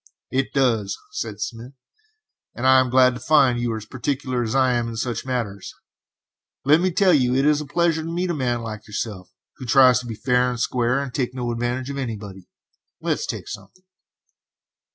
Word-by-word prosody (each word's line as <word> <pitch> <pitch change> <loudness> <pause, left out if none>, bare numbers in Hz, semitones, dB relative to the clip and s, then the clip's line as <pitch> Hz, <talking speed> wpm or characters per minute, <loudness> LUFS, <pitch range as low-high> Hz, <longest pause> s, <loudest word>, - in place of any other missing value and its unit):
"It 135 0 0
does," 115 -8 +1
said 105 -3 -5
Smith, 115 +4 -6 0.8
"and 120 - -4
I 130 0 +7
am 130 -1 +1
glad 130 0 +5
to 125 - -7
find 135 -6 +3
you 120 -1 -1
are - - -3
as 110 - -8
particular 130 +1 -2
as 115 +1 -2
I 130 -2 +3
am 120 -1 0
in 115 - -5
such 115 +2 -3
matters; 110 -7 -4 0.9
let 150 +4 +5
me 185 - +2
tell 185 +1 +3
you, 125 -4 +3
it 135 +2 +2
is 150 0 +3
a 150 - -7
pleasure 165 +1 +1
to 165 +1 -5
meet 175 +1 -1
a - - -1
man 125 -5 -1
like 110 -1 -7
yourself 105 -3 -5 0.3
who 130 - -8
tries 125 0 +6
to 125 - -8
be 115 - -5
fair 125 +2 +1
and 125 -1 -4
square, 125 +1 +1
and 140 -3 -5
to 135 - -1
take 125 0 -3
no 120 -2 -2
advantage 120 +3 -2
of 140 - -5
anybody. 105 -7 -6 0.5
Let's - - -2
take - - -5
something." 185 - -10
125 Hz, 205 wpm, -23 LUFS, 115-135 Hz, 0.9 s, I